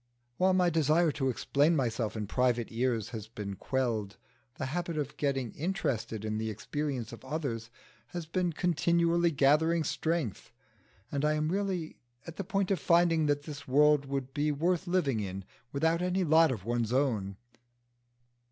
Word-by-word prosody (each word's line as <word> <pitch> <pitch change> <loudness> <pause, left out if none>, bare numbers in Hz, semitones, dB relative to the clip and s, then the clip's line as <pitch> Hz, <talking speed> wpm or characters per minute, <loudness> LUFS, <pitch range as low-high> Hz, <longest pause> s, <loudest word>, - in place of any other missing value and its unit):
While 185 0 +3
my 180 -1 +3
desire 160 +1 +3
to 135 -2 -1
explain 145 +6 +2
myself 115 -5 -1
in 105 - -2
private 120 +1 +1
ears 115 -2 0
has 110 -3 -6
been 105 -3 -6
quelled, 115 -5 -2 0.4
the 130 - -4
habit 170 +3 -3
of 150 -1 -3
getting 135 -5 -1
interested 120 - -2
in 110 0 -2
the 110 0 -2
experience 125 +2 -4
of 115 - -11
others 130 -5 -3 0.4
has 175 -2 -6
been 175 +2 0
continually 170 0 +2
gathering 155 +3 +3
strength, 160 - -2 0.6
and 140 0 -1
I 150 0 +3
am 155 0 0
really 185 -3 -2 0.3
at 165 -1 -9
the 195 - -2
point 195 +1 -1
of 190 - +1
finding 165 -1 +3
that 145 0 +1
this 145 -2 -8
world 145 +1 +4
would 135 -1 -3
be 150 +1 +1
worth 175 +5 0
living 165 -10 +1
in 95 -2 -5 0.3
without 160 +4 +1
any 180 +1 +1
lot 160 -1 +5
of 105 -6 -5
one's 120 -1 -1
own. 115 -8 0
145 Hz, 160 wpm, -30 LUFS, 120-170 Hz, 0.6 s, lot